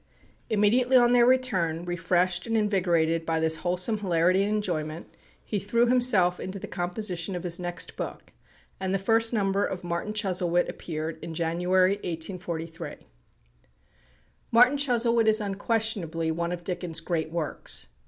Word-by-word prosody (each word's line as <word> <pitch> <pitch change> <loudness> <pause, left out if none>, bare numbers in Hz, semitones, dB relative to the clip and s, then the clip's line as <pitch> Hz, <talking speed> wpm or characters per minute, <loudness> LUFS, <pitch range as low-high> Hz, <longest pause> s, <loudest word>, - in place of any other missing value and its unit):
Immediately 235 +5 +3
on 240 -1 +5
their 245 -1 +5
return, 185 -11 +1
refreshed 175 +1 0
and 225 0 +1
invigorated 170 -6 +1
by 165 0 -1
this 160 0 +1
wholesome 180 +6 0
hilarity 180 -1 +2
and 205 +1 0
enjoyment, 165 -6 -3 0.3
he 210 - -2
threw 230 +5 +2
himself 235 -8 +3
into 190 +1 -5
the - - -7
composition 180 0 -3
of 175 - -5
his 175 -1 -1
next 175 0 -4
book, - - -7 0.5
and 190 0 -1
the - - +3
first 225 +4 +2
number 200 -3 +1
of 185 -1 -3
"Martin 175 +4 -3
Chuzzlewit" 180 -4 0
appeared 160 -1 -5
in 165 -1 -6
January, 180 +3 +2
1843. 165 -2 -5 1.6
"Martin 245 +4 +6
Chuzzlewit" 235 -4 +2
is 220 0 +5
unquestionably 200 -5 -1
one 170 +1 -2
of 175 -1 -5
Dickens' 175 -2 -4
great 165 -2 -2
works. 165 -2 -2
185 Hz, 145 wpm, -27 LUFS, 170-215 Hz, 1.6 s, Martin